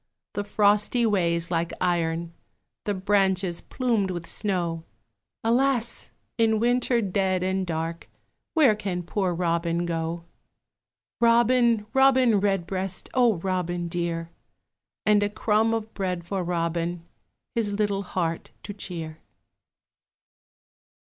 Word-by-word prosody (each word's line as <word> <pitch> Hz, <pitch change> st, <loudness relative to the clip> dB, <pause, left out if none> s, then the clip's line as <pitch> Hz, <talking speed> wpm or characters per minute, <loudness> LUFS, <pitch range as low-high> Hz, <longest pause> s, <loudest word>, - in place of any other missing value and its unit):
The 205 Hz, -, -2 dB
frosty 210 Hz, +3 st, +2 dB
ways 170 Hz, -5 st, +1 dB
like 170 Hz, 0 st, 0 dB
iron, 170 Hz, -1 st, 0 dB, 0.5 s
The 205 Hz, -2 st, 0 dB
branches 190 Hz, -2 st, +1 dB
plumed 230 Hz, -7 st, 0 dB
with 175 Hz, -2 st, -4 dB
snow, 170 Hz, -6 st, -1 dB, 0.6 s
Alas! 240 Hz, 0 st, +1 dB, 0.3 s
in 220 Hz, -1 st, +3 dB
winter 245 Hz, +1 st, +2 dB
dead 190 Hz, -1 st, 0 dB
and 190 Hz, 0 st, -1 dB
dark, 165 Hz, 0 st, -4 dB, 0.5 s
Where 285 Hz, -9 st, +6 dB
can 190 Hz, -4 st, -3 dB
poor 185 Hz, +1 st, -1 dB
Robin 170 Hz, 0 st, 0 dB
go? 165 Hz, 0 st, -3 dB, 0.9 s
Robin, 235 Hz, -1 st, +4 dB
Robin 260 Hz, -5 st, +5 dB
Redbreast, 190 Hz, -1 st, -2 dB
O 245 Hz, -4 st, +4 dB
Robin 175 Hz, -1 st, -2 dB
dear! 170 Hz, -1 st, -3 dB, 0.7 s
And 210 Hz, -1 st, +4 dB
a 205 Hz, -, +1 dB
crumb 215 Hz, +2 st, +1 dB
of 225 Hz, -1 st, -3 dB
bread 180 Hz, -3 st, -3 dB
for 190 Hz, +1 st, -2 dB
Robin, 170 Hz, 0 st, -2 dB, 0.5 s
His 215 Hz, -3 st, 0 dB
little 200 Hz, -1 st, 0 dB
heart 170 Hz, -4 st, -3 dB
to 205 Hz, -, -6 dB
cheer. 165 Hz, -5 st, -6 dB
190 Hz, 110 wpm, -26 LUFS, 170-215 Hz, 0.9 s, Where